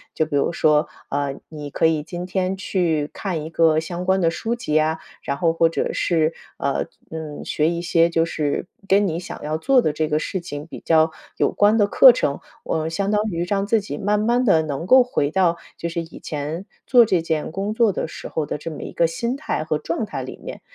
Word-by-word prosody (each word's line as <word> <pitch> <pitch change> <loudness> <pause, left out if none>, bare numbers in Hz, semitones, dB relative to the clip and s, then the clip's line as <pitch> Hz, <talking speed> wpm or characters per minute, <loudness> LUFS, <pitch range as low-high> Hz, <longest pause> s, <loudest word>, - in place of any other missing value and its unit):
就 155 - +1
比 155 -2 -4
如 140 - +2
说， 150 -3 +3 0.2
啊， 145 0 -1 0.2
你 150 -2 -7
可 145 - 0
以 160 -2 +3
今 175 +4 -6
天 185 +1 -1
去 170 -6 0
看 175 -6 -3
一 160 - -7
个 160 -2 +4
相 175 +2 -5
关 190 +1 +2
的 165 -2 +2
书 225 +8 -2
籍 240 -10 -4
呀， 155 +1 +2 0.2
然 140 - -3
后 165 0 +2
或 165 0 +3
者 165 - -2
是， 160 -2 +1 0.2
呃， 140 - -1 0.2
嗯， 160 -2 -6
学 155 +1 +1
一 170 0 -3
些 170 -1 +3
就 165 -1 +2
是 150 -2 -2 0.2
跟 200 +1 +4
你 165 -1 -2
想 180 - -8
要 155 +1 -2
做 265 +9 +4
的 155 -11 +1
这 155 +1 -1
个 150 0 +1
事 185 +4 -2
情 145 -3 -7
比 165 - -9
较 160 0 +4 0.3
有 - - +2
关 210 +2 +4
的 210 - +4
课 - - +8
程， - - -1 0.2
呃， 160 0 -1
相 195 +5 -1
当 210 0 +2
于 170 -2 -2
让 195 +2 -1
自 225 +1 +3
己 195 -8 -6
慢 205 +1 +1
慢 240 +4 +2
地 180 -9 +4
能 155 +2 -4
够 260 +3 +7
回 195 -12 0
到 175 0 +2 0.2
就 170 - -3
是 170 0 -3
以 165 -1 -10
前 155 +5 -4 0.2
做 245 -3 +7
这 185 -5 +1
件 160 -2 -2
工 200 +5 -3
作 225 -2 +4
的 180 - -3
时 - - -8
候 155 -2 -3
的 - - -3
这 165 +3 -6
么 155 - -8
一 - - -6
个 170 - +2
心 235 +10 -2
态 280 - -2
和 155 -1 -1
状 165 +7 -3
态 - - -5
里 - - -7
面， - - -8
165 Hz, 250 characters per minute, -22 LUFS, 155-195 Hz, 0.3 s, 课